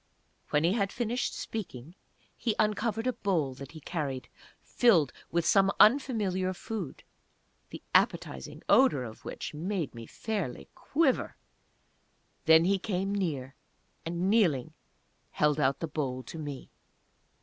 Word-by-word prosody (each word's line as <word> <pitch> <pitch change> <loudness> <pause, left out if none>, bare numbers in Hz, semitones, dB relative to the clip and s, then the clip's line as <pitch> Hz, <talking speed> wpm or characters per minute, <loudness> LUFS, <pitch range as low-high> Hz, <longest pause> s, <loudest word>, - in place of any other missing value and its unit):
When 150 +1 +2
he 170 +3 +3
had 200 -3 0
finished 240 +1 -2
speaking 165 - -6 0.4
he 230 -3 -1
uncovered 215 +1 0
a 255 - +1
bowl 165 - 0
that 140 +2 -10
he 160 - -9
carried 140 -5 -4 0.3
filled 175 - +3 0.2
with 170 0 0
some 195 -1 +4
unfamiliar 210 -7 +3
food, 220 +3 -6 0.7
the - - -9
appetizing - - +1
odour 255 - +5
of 110 -2 -9
which - - -6
made 170 0 -3
me 115 -1 -9
fairly 200 - -4
quiver! 280 -3 0 1.1
Then 160 +1 +7
he 195 +1 +2
came 195 0 -2
near, 145 -10 -2 0.5
and 170 +2 -2
kneeling, 185 - +2 0.6
held 150 0 +2
out 135 -1 +1
the 165 - -1
bowl 130 -4 -3
to 160 - -8
me. 145 -3 -7
180 Hz, 130 wpm, -30 LUFS, 145-210 Hz, 1.1 s, Then